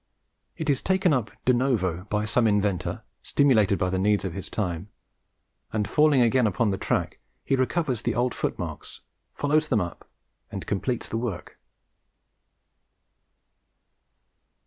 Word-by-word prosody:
It 160 - -4
is 140 -3 +2
taken 190 -3 +2
up 125 -5 0 0.2
de 125 - +5
novo 100 -9 0
by 105 0 -1
some 115 +2 +2
inventor, 100 -4 0 0.2
stimulated 110 -9 +3
by 90 +1 0
the 95 - 0
needs 100 +1 +2
of 95 - -3
his 95 +1 -6
time, 90 -2 -3 0.8
and 105 -2 -1
falling 150 +2 +4
again 120 0 +3
upon 105 +2 +1
the 95 - -1
track, - - -1 0.3
he 135 - +2
recovers 130 -2 0
the - - -1
old 120 0 +1
footmarks, - - -5 0.3
follows 150 +2 +1
them 125 -8 +2
up, 85 -4 -6 0.4
and - - -5
completes 120 +5 -2
the 115 - -3
work. 115 -7 -5
110 Hz, 140 wpm, -26 LUFS, 100-130 Hz, 0.8 s, de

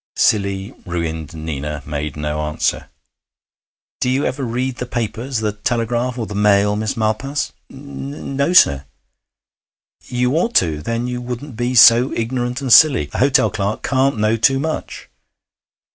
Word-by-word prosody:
Silly, 100 -2 0
ruined 80 -3 -4
Nina 75 -2 -5
made 75 -1 -4
no 75 0 -3
answer. 75 +1 -2 1.1
'Do 125 - 0
you 135 +3 0
ever 140 - -3
read 125 +1 -2
the 125 - -5
papers 120 +1 -3
the 105 -1 0
Telegraph 120 +3 -2
or 115 - -3
the 105 - -8
Mail, 105 0 +3
Miss 110 0 -3
Malpas?' 115 +7 -1 0.2
'N 140 0 -8
no, 140 +4 +1
sir.' 70 - +5 1.2
'You 125 +1 -1
ought 235 +8 -1
to, 80 -4 +2
then 115 +8 -2
you 125 0 -4
wouldn't 125 +2 -7
be 120 +2 -2
so 120 +2 +7
ignorant 125 +2 -2
and 130 -4 +3
silly. 125 - +6
A - - -3
hotel 135 +1 +3
clerk 105 0 -3
can't 135 -2 +1
know 110 +1 +1
too 135 +4 +3
much. 155 +3 -4
115 Hz, 150 wpm, -19 LUFS, 100-130 Hz, 1.2 s, so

